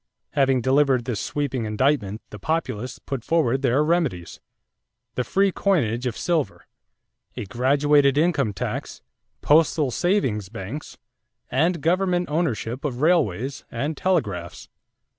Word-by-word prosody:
Having 135 Hz, -3 st, +2 dB
delivered 130 Hz, -1 st, +3 dB
this 120 Hz, -6 st, -2 dB
sweeping 135 Hz, -5 st, -2 dB
indictment, 110 Hz, -2 st, 0 dB
the 105 Hz, -, -9 dB
Populists 130 Hz, -2 st, -2 dB
put 135 Hz, -4 st, -5 dB
forward 135 Hz, -6 st, +1 dB
their 135 Hz, +2 st, +2 dB
remedies: 150 Hz, -, -1 dB, 0.7 s
the 125 Hz, -, -1 dB
free 195 Hz, -, +2 dB
coinage 130 Hz, -, 0 dB
of 120 Hz, -, -3 dB
silver, 155 Hz, -, -1 dB, 0.7 s
a -, -, -4 dB
graduated 140 Hz, +5 st, +3 dB
income 150 Hz, -8 st, +2 dB
tax, 100 Hz, -, -5 dB, 0.4 s
postal 150 Hz, -2 st, +3 dB
savings 130 Hz, -, 0 dB
banks, 115 Hz, +7 st, -7 dB, 0.5 s
and 165 Hz, +4 st, +1 dB
government 180 Hz, +1 st, +1 dB
ownership 135 Hz, -6 st, -1 dB
of 130 Hz, -4 st, -3 dB
railways 140 Hz, -, +1 dB
and 140 Hz, +7 st, -3 dB
telegraphs. 105 Hz, -, -2 dB
135 Hz, 120 wpm, -23 LUFS, 115-160 Hz, 0.7 s, delivered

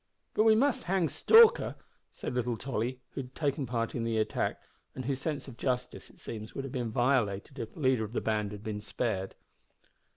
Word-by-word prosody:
"But 215 Hz, -, +3 dB
we 220 Hz, -1 st, +7 dB
must 265 Hz, -3 st, +2 dB
hang 180 Hz, -2 st, +1 dB
Stalker," 460 Hz, -, +6 dB, 0.4 s
said -, -, -5 dB
little 125 Hz, -1 st, -1 dB
Tolly, 125 Hz, +1 st, -3 dB
who -, -, -4 dB
had 130 Hz, 0 st, -12 dB
taken 145 Hz, -3 st, -1 dB
part 115 Hz, -1 st, -1 dB
in 120 Hz, -, -2 dB
the 115 Hz, -1 st, 0 dB
attack, 110 Hz, 0 st, 0 dB, 0.4 s
and 130 Hz, -, -5 dB
whose 135 Hz, 0 st, -1 dB
sense 150 Hz, -4 st, -3 dB
of 125 Hz, -4 st, -10 dB
justice, 125 Hz, -1 st, -2 dB
it -, -, -20 dB
seems, 110 Hz, -1 st, -7 dB
would 135 Hz, -, -3 dB
have 135 Hz, -, -7 dB
been 120 Hz, -3 st, -2 dB
violated 120 Hz, 0 st, +1 dB
if 115 Hz, -2 st, -6 dB
the -, -, -10 dB
leader 130 Hz, -4 st, +3 dB
of 110 Hz, +1 st, -6 dB
the -, -, +1 dB
band 105 Hz, -2 st, 0 dB
had 105 Hz, 0 st, -8 dB
been 105 Hz, -1 st, -4 dB
spared. 105 Hz, -3 st, -2 dB
125 Hz, 205 wpm, -30 LUFS, 110-140 Hz, 0.4 s, we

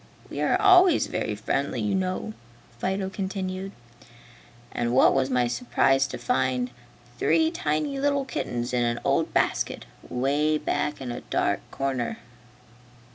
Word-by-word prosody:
We -, -, -4 dB
are -, -, +2 dB
always 370 Hz, -4 st, +6 dB
very 105 Hz, -, -2 dB
friendly, 125 Hz, +5 st, -2 dB
you 105 Hz, -2 st, 0 dB
know." 185 Hz, +3 st, -2 dB, 0.5 s
Fido 190 Hz, +4 st, -1 dB
continued. 190 Hz, -1 st, -4 dB, 1.0 s
"And 120 Hz, +1 st, -1 dB
what -, -, +6 dB
was 135 Hz, -1 st, +1 dB
my 125 Hz, -2 st, +2 dB
surprise 125 Hz, +3 st, +2 dB
to -, -, -6 dB
find 130 Hz, -, 0 dB, 0.5 s
three 160 Hz, 0 st, +3 dB
tiny 155 Hz, -, -1 dB
little 280 Hz, -1 st, +1 dB
kittens 120 Hz, -, -3 dB
in 125 Hz, -1 st, +2 dB
an 120 Hz, 0 st, 0 dB
old -, -, +1 dB
basket, -, -, 0 dB, 0.2 s
'way 145 Hz, +4 st, +1 dB
back 150 Hz, -1 st, -2 dB
in 125 Hz, -2 st, -4 dB
a 120 Hz, -, -5 dB
dark -, -, 0 dB
corner!" 135 Hz, -3 st, -2 dB
140 Hz, 135 wpm, -26 LUFS, 125-190 Hz, 1.0 s, always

